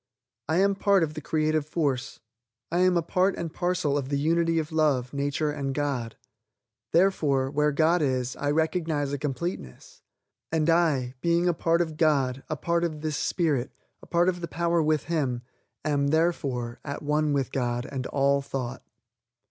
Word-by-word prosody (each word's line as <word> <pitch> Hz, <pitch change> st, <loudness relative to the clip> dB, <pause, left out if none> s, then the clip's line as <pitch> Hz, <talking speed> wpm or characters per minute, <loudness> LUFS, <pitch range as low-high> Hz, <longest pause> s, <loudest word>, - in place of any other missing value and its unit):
I 160 Hz, -, +2 dB
am 200 Hz, +1 st, +4 dB
part 195 Hz, -2 st, +3 dB
of 155 Hz, -1 st, -2 dB
the 155 Hz, -, -6 dB
creative 155 Hz, 0 st, 0 dB
force. 140 Hz, -4 st, -2 dB, 0.5 s
I 175 Hz, -, +1 dB
am 185 Hz, -1 st, +4 dB
a 170 Hz, -, +1 dB
part 185 Hz, +4 st, +1 dB
and 165 Hz, -2 st, -5 dB
parcel 175 Hz, -5 st, 0 dB
of 135 Hz, -1 st, -5 dB
the 140 Hz, -, 0 dB
Unity 165 Hz, +3 st, +2 dB
of 155 Hz, -1 st, -2 dB
Love, 145 Hz, -5 st, +1 dB
Nature 145 Hz, +2 st, -1 dB
and 140 Hz, -2 st, -3 dB
God. 135 Hz, -6 st, -2 dB, 0.7 s
Therefore, 150 Hz, -8 st, +2 dB
where 150 Hz, +1 st, +2 dB
God 160 Hz, +4 st, +3 dB
is, 130 Hz, -3 st, 0 dB
I 145 Hz, -, -1 dB
recognize 160 Hz, -2 st, 0 dB
a 145 Hz, -, -2 dB
completeness. 145 Hz, -, -5 dB, 0.5 s
And 160 Hz, 0 st, +2 dB
I, 150 Hz, -7 st, +2 dB
being 170 Hz, +2 st, +2 dB
a 175 Hz, -, +3 dB
part 165 Hz, +1 st, +1 dB
of 160 Hz, -3 st, -3 dB
God, 135 Hz, -5 st, +2 dB
a 155 Hz, -, -2 dB
part 170 Hz, +3 st, 0 dB
of 155 Hz, -3 st, -2 dB
this 155 Hz, -1 st, -2 dB
spirit, 150 Hz, -7 st, 0 dB, 0.3 s
a -, -, -14 dB
part 175 Hz, +1 st, +2 dB
of 180 Hz, -1 st, 0 dB
the 170 Hz, -, -3 dB
power 170 Hz, +1 st, +1 dB
with 155 Hz, -2 st, +1 dB
Him, 135 Hz, -8 st, -1 dB, 0.4 s
am, 145 Hz, -2 st, +1 dB
therefore, 140 Hz, -7 st, 0 dB
at 140 Hz, +1 st, -5 dB
one 150 Hz, +1 st, +1 dB
with 140 Hz, -3 st, 0 dB
God 120 Hz, -1 st, -1 dB
and 130 Hz, -2 st, -4 dB
all 140 Hz, 0 st, +2 dB
thought. 130 Hz, -3 st, -5 dB
150 Hz, 175 wpm, -26 LUFS, 140-170 Hz, 0.7 s, am